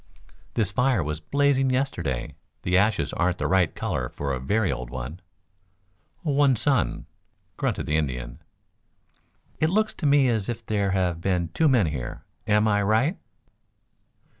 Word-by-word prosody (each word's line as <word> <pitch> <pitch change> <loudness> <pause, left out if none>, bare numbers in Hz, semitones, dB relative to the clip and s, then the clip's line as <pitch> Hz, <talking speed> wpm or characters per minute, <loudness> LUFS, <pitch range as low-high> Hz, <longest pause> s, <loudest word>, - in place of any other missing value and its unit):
This 105 -4 +1
fire 125 -3 +2
was 75 +1 -3
blazing 135 - +2
yesterday. 85 - -1 0.3
The 90 - +1
ashes 105 +4 +2
aren't 90 0 +1
the - - -3
right 95 -4 +2
color - - -2
for 70 -1 -3
a 65 - -2
very 100 - +1
old - - -5
one." 65 +7 -6 1.0
"One 145 -4 +3
sun," 130 +3 0 0.5
grunted - - -1
the 75 - +1
Indian. 65 -4 -3 1.2
"It 155 - +3
looks 215 +4 +1
to 155 - -2
me 140 -2 +5
as 110 -4 0
if 115 -1 -5
there 100 -3 0
had 90 -3 0
been 90 -3 0
two 160 - +2
men 120 -8 +4
here. 70 -6 -5 0.2
Am 105 +1 +3
I 105 -1 +2
right?" 110 - +1
100 Hz, 150 wpm, -25 LUFS, 80-130 Hz, 1.2 s, me